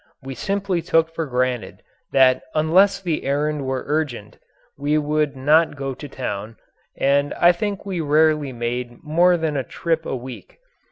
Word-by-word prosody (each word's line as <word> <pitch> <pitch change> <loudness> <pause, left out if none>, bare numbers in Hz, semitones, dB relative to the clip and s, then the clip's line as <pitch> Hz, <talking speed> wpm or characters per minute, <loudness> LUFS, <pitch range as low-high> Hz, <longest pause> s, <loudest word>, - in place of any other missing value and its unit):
We 135 0 -6
simply 195 +4 -2
took 165 -1 +1
for 165 -2 -3
granted 125 -2 -2 0.3
that 130 -1 +4
unless 185 +6 +4
the 175 -5 -2
errand 145 0 -1
were 130 -1 -2
urgent 145 -8 -3 0.4
we 145 +2 0
would 150 -1 0
not 150 +5 +3
go 135 -1 -4
to 145 +3 -9
town, 110 -4 -5 0.4
and 140 +1 +1
I 175 - +6
think 200 +3 -4
we 185 -4 -3
rarely 150 -1 +2
made 120 0 -4
more 175 +3 +3
than 160 -2 -2
a 135 - 0
trip 165 +4 -2
a - - -2
week. 125 0 -9
150 Hz, 160 wpm, -22 LUFS, 130-165 Hz, 0.4 s, I